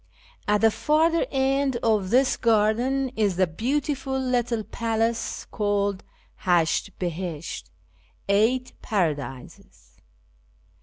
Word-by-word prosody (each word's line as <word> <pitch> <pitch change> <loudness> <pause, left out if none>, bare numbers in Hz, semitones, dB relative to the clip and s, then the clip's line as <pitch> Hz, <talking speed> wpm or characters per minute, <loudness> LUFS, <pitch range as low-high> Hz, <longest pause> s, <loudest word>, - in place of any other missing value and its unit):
At 210 0 +2
the 225 0 +5
farther 310 +9 +2
end 270 0 +1
of 215 -4 +2
this 255 +4 +3
garden 235 +4 +2
is 205 -4 +1
the 185 +1 +3
beautiful 265 - -2
little 245 -3 0
palace 230 +1 -2
called 205 -2 0 0.4
Ilasht 175 -3 +2
Bihisht 175 -3 -4 0.3
(" - - -36
Eight 225 +6 +2
Paradises 145 - -4
225 Hz, 100 wpm, -25 LUFS, 195-260 Hz, 0.4 s, the